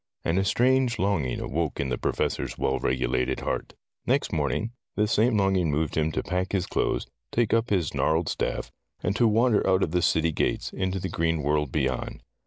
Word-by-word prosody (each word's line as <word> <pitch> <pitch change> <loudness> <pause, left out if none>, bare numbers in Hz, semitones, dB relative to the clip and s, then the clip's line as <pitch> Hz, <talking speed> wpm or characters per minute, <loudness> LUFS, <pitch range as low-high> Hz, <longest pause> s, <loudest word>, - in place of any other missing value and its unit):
And 85 +3 +2
a - - +2
strange 125 +4 +2
longing 90 - 0
awoke 80 +1 -2
in 70 - -1
the - - -1
Professor's - - -1
well 65 - 0
regulated 65 0 0
heart. - - -3 0.3
Next - - +1
morning 75 - -1 0.2
this 105 0 +1
same 110 +1 +3
longing 95 -4 +2
moved 75 +1 -1
him 80 0 +1
to - - -1
pack 90 +1 -2
his 95 -3 +1
clothes, - - -1 0.3
take 120 -2 +1
up 115 +1 +2
his 90 -6 0
gnarled 80 +2 +1
staff, - - -2 0.3
and 90 +3 0
to 115 +1 +4
wander 115 0 +3
out 95 0 +3
of 80 - -1
the 90 0 +1
city 80 -1 +2
gates, - - -1
into 95 0 -1
the 95 - -3
green 80 -3 0
world 75 -2 +1
beyond. 65 -1 -2
90 Hz, 195 wpm, -26 LUFS, 75-105 Hz, 0.3 s, to